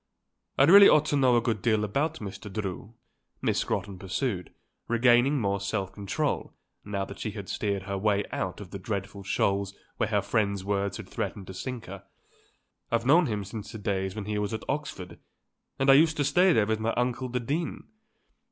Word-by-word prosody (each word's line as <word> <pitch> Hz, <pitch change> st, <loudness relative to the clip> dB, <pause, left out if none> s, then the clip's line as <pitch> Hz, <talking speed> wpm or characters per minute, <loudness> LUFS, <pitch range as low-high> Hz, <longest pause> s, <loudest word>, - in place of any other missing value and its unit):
I -, -, +6 dB
really 200 Hz, +7 st, +9 dB
ought 150 Hz, 0 st, +5 dB
to -, -, +2 dB
know 130 Hz, -3 st, +4 dB
a -, -, +3 dB
good 115 Hz, -4 st, -1 dB
deal 110 Hz, -3 st, +2 dB
about 140 Hz, +10 st, 0 dB
Mr. 100 Hz, 0 st, -8 dB
Drew," 100 Hz, +2 st, -5 dB, 0.4 s
Miss -, -, 0 dB
Scrotton 95 Hz, -2 st, -3 dB
pursued, 95 Hz, 0 st, -3 dB, 0.4 s
regaining 120 Hz, +4 st, +4 dB
more 100 Hz, -3 st, 0 dB
self 100 Hz, -1 st, -2 dB
control, 100 Hz, -3 st, -2 dB, 0.3 s
now 100 Hz, -1 st, -3 dB
that -, -, -10 dB
she -, -, -3 dB
had 100 Hz, -3 st, -7 dB
steered 100 Hz, -3 st, -2 dB
her 100 Hz, 0 st, -3 dB
way 100 Hz, 0 st, +1 dB
out 95 Hz, -1 st, -3 dB
of 100 Hz, -3 st, -10 dB
the 100 Hz, -, -6 dB
dreadful 100 Hz, 0 st, -4 dB
shoals 100 Hz, 0 st, 0 dB, 0.2 s
where 110 Hz, -, 0 dB
her 105 Hz, -3 st, +1 dB
friend's 100 Hz, -2 st, 0 dB
words 100 Hz, -1 st, -1 dB
had -, -, -9 dB
threatened 100 Hz, -, -4 dB
to 95 Hz, -, -9 dB
sink 125 Hz, +5 st, -5 dB
her; 100 Hz, +1 st, -9 dB, 0.9 s
"I've 115 Hz, 0 st, +1 dB
known 160 Hz, +5 st, +5 dB
him 105 Hz, -3 st, -2 dB
since 105 Hz, +2 st, -7 dB
the -, -, -7 dB
days 95 Hz, -2 st, -2 dB
when 105 Hz, -2 st, -5 dB
he 105 Hz, 0 st, -2 dB
was 105 Hz, +1 st, -2 dB
at 110 Hz, -, -7 dB
Oxford 135 Hz, -11 st, -4 dB, 0.6 s
and 135 Hz, -, 0 dB
I 135 Hz, -, +9 dB
used 160 Hz, +3 st, +5 dB
to 145 Hz, -, +2 dB
stay 175 Hz, +7 st, +4 dB
there 110 Hz, -10 st, +3 dB
with 110 Hz, +1 st, -1 dB
my 115 Hz, +1 st, 0 dB
uncle 125 Hz, +1 st, -1 dB
the 125 Hz, +1 st, -1 dB
Dean. 150 Hz, +8 st, -3 dB
105 Hz, 200 wpm, -28 LUFS, 100-125 Hz, 0.9 s, really